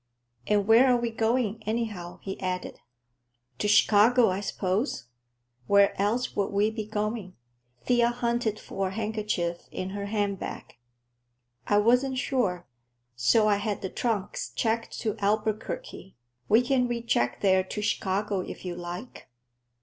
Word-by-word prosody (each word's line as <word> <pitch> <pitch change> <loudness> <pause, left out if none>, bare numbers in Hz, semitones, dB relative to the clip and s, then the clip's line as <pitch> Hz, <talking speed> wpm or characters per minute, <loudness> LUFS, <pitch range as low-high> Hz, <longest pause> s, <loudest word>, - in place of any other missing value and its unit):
"And 205 -1 +2
where 230 +4 +7
are 250 -1 +4
we 235 -1 -2
going, 225 -1 0
anyhow?" 215 -6 -3
he 195 - -6
added. 185 -1 -3 0.8
"To 210 - 0
Chicago, 220 +2 +5
I 185 - -2
suppose. 200 - -2 0.6
Where 200 0 +5
else 225 +5 0
would 200 -1 +1
we 205 +2 +1
be 220 -2 -5
going?" 215 -3 -3 0.5
Thea 240 -1 +3
hunted 235 -2 -1
for 195 -1 -3
a - - -4
handkerchief 210 -5 -2
in 185 +1 -5
her 200 0 -4
handbag. 205 -2 -3 0.9
"I 205 - +3
wasn't 250 +5 +3
sure, 205 -10 -1 0.5
so 215 - +3
I 205 -1 +3
had 205 0 -3
the 190 - -3
trunks 220 -5 -2
checked 225 0 -1
to 215 -2 -1
Albuquerque. 215 -1 -2 0.3
We 225 +4 +5
can 250 -1 +2
recheck 230 - -1
there 190 -2 +4
to 210 - -5
Chicago, 200 0 0
if 185 - -7
you 180 - -3
like. 175 - -8
210 Hz, 140 wpm, -27 LUFS, 195-230 Hz, 0.9 s, where